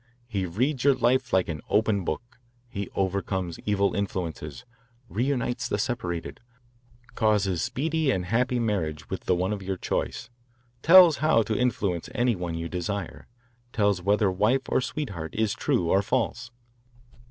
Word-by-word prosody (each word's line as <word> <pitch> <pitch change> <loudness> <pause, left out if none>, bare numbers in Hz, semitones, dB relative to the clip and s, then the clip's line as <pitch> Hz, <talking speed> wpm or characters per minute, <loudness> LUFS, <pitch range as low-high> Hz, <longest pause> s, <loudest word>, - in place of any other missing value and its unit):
He 100 -6 -2
reads 125 - -1
your 140 -1 +5
life 130 +1 +1
like 95 -1 +3
an 75 -4 -4
open 105 -3 +2
book; 120 +9 -5 0.3
he 100 -5 -5
overcomes 95 -2 -2
evil 100 -1 +2
influences, 90 -2 -4 0.4
reunites 125 +3 -1
the - - 0
separated, 90 -7 -3 0.7
causes 105 -6 +1
speedy 160 +2 0
and 95 -8 0
happy 125 +5 +1
marriage 90 -10 -2
with 95 - -4
the 90 - +3
one 95 +4 0
of 100 - -5
your 95 0 -3
choice, - - -3 0.5
tells 170 -1 +8
how 155 -7 +3
to 110 +1 -2
influence 105 -6 -1
any 120 -2 +2
one 90 -2 -4
you 85 0 -3
desire, 90 +2 -4 0.5
tells 100 -4 +2
whether 100 +1 +2
wife 110 +8 +1
or - - +2
sweetheart 100 - -5
is 110 -2 +1
true 85 -2 0
or 95 - +4
false. 125 +3 -1
100 Hz, 150 wpm, -26 LUFS, 90-125 Hz, 0.7 s, tells